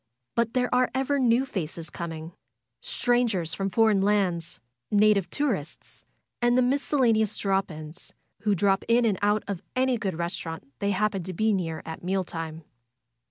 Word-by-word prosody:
But 230 0 0
there 250 0 +1
are 250 0 +3
ever 270 +2 +1
new 245 +1 +3
faces 165 - -5
coming; 165 -1 -6 0.5
strangers 230 -9 +1
from 195 0 -1
foreign 210 0 +3
lands, 185 -5 0 0.3
native 205 -2 +4
tourists, 225 - -3 0.3
and 240 +1 +3
the 255 - +5
miscellaneous 245 -5 +2
drop 195 -1 0
ins, 155 +2 -9 0.3
who 205 0 +1
drop 195 +1 +2
in 235 +1 +4
and 205 -5 +1
out 205 +1 +2
of 195 -4 -4
any 255 -2 +2
good 195 -5 -2
restaurant 165 -3 -4
they 200 - 0
happen 205 0 0
to 185 +2 -6
be 215 +4 +2
near 165 -5 -2
at 160 +1 -7
meal 190 +1 0
time. 165 -2 -6
200 Hz, 160 wpm, -26 LUFS, 170-235 Hz, 0.5 s, the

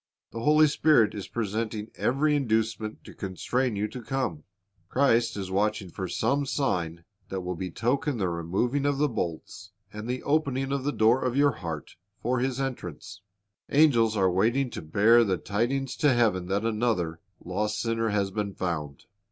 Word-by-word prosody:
The 115 - -6
Holy 155 +5 +5
Spirit 145 -6 +4
is 100 -3 -6
presenting 110 -1 -3
every 150 +4 +1
inducement 110 -4 -1
to - - -12
constrain 115 +5 -2
you 105 +1 -1
to 125 +3 -7
come. 115 - -3 0.4
Christ 120 -5 +2
is 95 -2 -4
watching 100 -1 0
for 95 +2 -4
some 140 +10 0
sign 85 - -1 0.3
that 95 -1 -3
will 90 0 -3
betoken 120 - -1
the 95 -4 0
removing 95 +12 -1
of 145 -1 +1
the 150 +1 +3
bolts 100 - -5 0.2
and 105 +2 -6
the 125 0 -3
opening 140 -3 0
of 140 -1 -1
the 145 - +1
door 115 +1 +3
of 125 0 -1
your 145 0 +5
heart 80 - -7 0.2
for 125 +2 0
His 130 +1 -1
entrance. 125 - -5 0.5
Angels 120 -7 +4
are 95 -2 +3
waiting 120 +8 +1
to - - -6
bear 105 +9 +5
the 95 -4 0
tidings 125 +7 -1
to 150 - +4
heaven 110 -7 +2
that 100 +3 0
another 105 -8 0 0.2
lost 105 +4 -2
sinner 115 -1 0
has 100 -2 0
been 100 -1 -3
found. 75 -6 -4
110 Hz, 170 wpm, -27 LUFS, 95-130 Hz, 0.5 s, Holy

